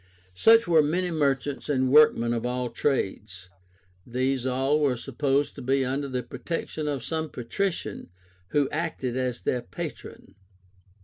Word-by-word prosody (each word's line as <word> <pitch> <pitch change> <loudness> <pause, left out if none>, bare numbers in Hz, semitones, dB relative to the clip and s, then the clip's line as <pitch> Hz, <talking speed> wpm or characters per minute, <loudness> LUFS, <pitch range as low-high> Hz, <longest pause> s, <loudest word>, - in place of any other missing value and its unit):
Such 225 - +5
were 165 -2 +5
many 175 +4 0
merchants 140 -3 -1
and 130 -2 +1
workmen 135 -5 +5
of 115 -1 -2
all 125 0 -2
trades. 95 -8 -2 0.5
These 130 +2 -1
all 135 +4 +1
were 140 -4 +1
supposed 135 +3 0
to 140 - -9
be 135 +1 +1
under 140 +2 -2
the 125 -2 -3
protection 150 +4 -4
of 140 -4 -2
some 160 +4 -3
patrician 125 - -3 0.4
who 145 +6 +1
acted 150 -6 -2
as 130 -2 -2
their 125 - -1
patron. 95 -2 -8
135 Hz, 140 wpm, -26 LUFS, 125-150 Hz, 0.5 s, Such